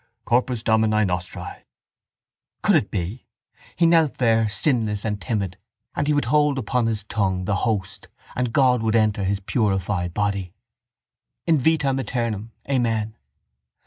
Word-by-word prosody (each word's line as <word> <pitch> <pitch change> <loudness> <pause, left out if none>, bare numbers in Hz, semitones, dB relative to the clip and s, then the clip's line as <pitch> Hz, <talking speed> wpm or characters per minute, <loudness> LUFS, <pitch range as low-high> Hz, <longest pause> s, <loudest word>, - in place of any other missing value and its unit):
—Corpus 120 -1 +1
Domini 110 -2 +3
nostri. 90 0 -3 1.2
Could - - +4
it 105 - +2
be? 100 +5 -4 0.5
He 170 - +3
knelt 165 -3 +3
there 115 -3 +2
sinless 105 -1 +1
and 105 -2 -2
timid; 100 -6 -3 0.4
and 145 - -1
he 150 - +3
would 145 - +1
hold 150 -2 +2
upon 125 -1 0
his 110 -3 -1
tongue 95 -3 -1
the 100 +1 0
host 95 -3 -3 0.3
and 125 -2 -1
God 125 -2 +3
would 110 0 +1
enter 105 -3 +2
his 100 +1 0
purified 95 -5 -1
body. 100 -3 -1 0.9
—_In 160 -3 +4
vitam 140 -2 +2
eternam. 115 -5 -3 0.2
Amen. 115 -5 0
110 Hz, 140 wpm, -23 LUFS, 100-125 Hz, 1.2 s, Could